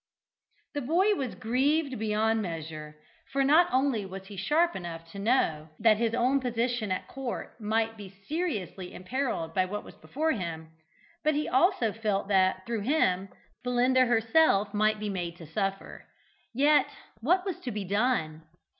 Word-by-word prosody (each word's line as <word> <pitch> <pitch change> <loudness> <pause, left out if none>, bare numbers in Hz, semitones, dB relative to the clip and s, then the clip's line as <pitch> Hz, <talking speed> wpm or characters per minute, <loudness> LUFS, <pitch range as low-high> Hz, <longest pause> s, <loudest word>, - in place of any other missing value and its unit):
The 290 - -2
boy 350 +10 +3
was 270 - -3
grieved 265 +3 0
beyond 220 +1 +1
measure, 155 -4 -6 0.4
for 275 0 +2
not 315 +6 +5
only 255 -4 +1
was 190 0 -8
he 200 +1 -10
sharp 310 - +2
enough 165 -2 -6
to 200 - -8
know 180 -9 +1
that 220 -1 +4
his 230 0 0
own 255 +3 +2
position 240 -3 -1
at 185 - -2
court 265 -3 -6
might 225 +1 0
be 200 -2 -9
seriously 195 - -4
imperilled 185 -5 -3
by 185 +1 +2
what 210 +3 -5
was - - -12
before 315 +3 -2
him, 165 - -4 0.5
but 310 -1 +2
he 300 - 0
also 260 - +2
felt 205 -3 -1
that, 185 -1 +2
through 230 -2 -2
him, 195 -7 +1 0.3
Belinda 250 +1 +3
herself 225 -3 +3
might 215 +1 +2
be 210 -1 -3
made 175 -3 -4
to 165 - -10
suffer. 195 +4 -4 0.4
Yet 290 +4 +4 0.3
what 360 - +2
was 380 -4 -3
to 250 - -5
be 210 -3 -4
done? 200 -6 0
220 Hz, 160 wpm, -28 LUFS, 190-265 Hz, 0.5 s, not